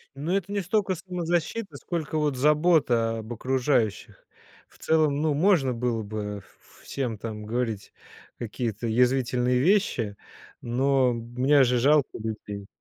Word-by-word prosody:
Ну 150 +6 -3
это 195 0 -1
не 205 -1 -1
столько 190 +1 0
самозащита, 180 +3 -3
сколько 160 -3 -3
вот 150 -3 0
забота 140 -6 +2
об 110 +1 -9
окружающих. 120 -3 -1 0.4
В - - -23
целом, 155 -3 +1
ну, 155 -1 +1
можно 150 -5 +3
было 115 -1 -1
бы 105 -1 -5 0.2
в - - -22
всем 125 -5 -3
там 105 0 -6
говорить 115 -2 -3 0.5
какие-то 115 -1 -3
язвительные 125 +1 +2
вещи, 130 - +1 0.4
но 130 +1 +2
мне 125 +5 +2
же 125 0 +2
жалко 140 +3 +3
людей. 105 -2 -6
130 Hz, 130 wpm, -26 LUFS, 115-155 Hz, 0.5 s, можно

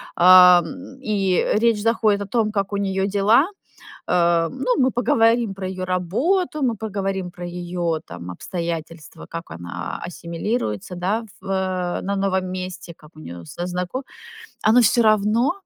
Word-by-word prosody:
ам, 185 +10 +6
и 200 -7 +1
речь 225 -1 +2
заходит 220 -2 +2
о 200 - -4
том, 215 +1 0
как 200 -1 -2
у - - 0
неё 195 -1 0
дела. 205 - +3 0.6
Э, 170 -1 +3
ну, 255 +5 -1
мы 260 -2 +3
поговорим 230 -2 +2
про 190 -1 -5
её 185 0 -4
работу, 260 - 0
мы 240 -4 +1
поговорим 195 -4 -3
про 175 0 -9
её 175 -1 -3
там, 90 - -8
обстоятельства, 165 - -6
как 165 +1 -7
она 85 0 -6
ассимилируется, 170 - -4
да, 195 +6 -1 0.2
в, 190 - -15
э, 185 -2 -1
на 200 +1 -2
новом 190 -1 0
месте, 185 -1 -6
как 150 - -18
у - - -14
неё 85 - -9
со 175 - -6
знако 180 +8 -3 0.7
Оно 235 +3 +6
всё 235 +2 +4
равно 215 +5 +3
190 Hz, 155 wpm, -22 LUFS, 175-220 Hz, 0.7 s, ам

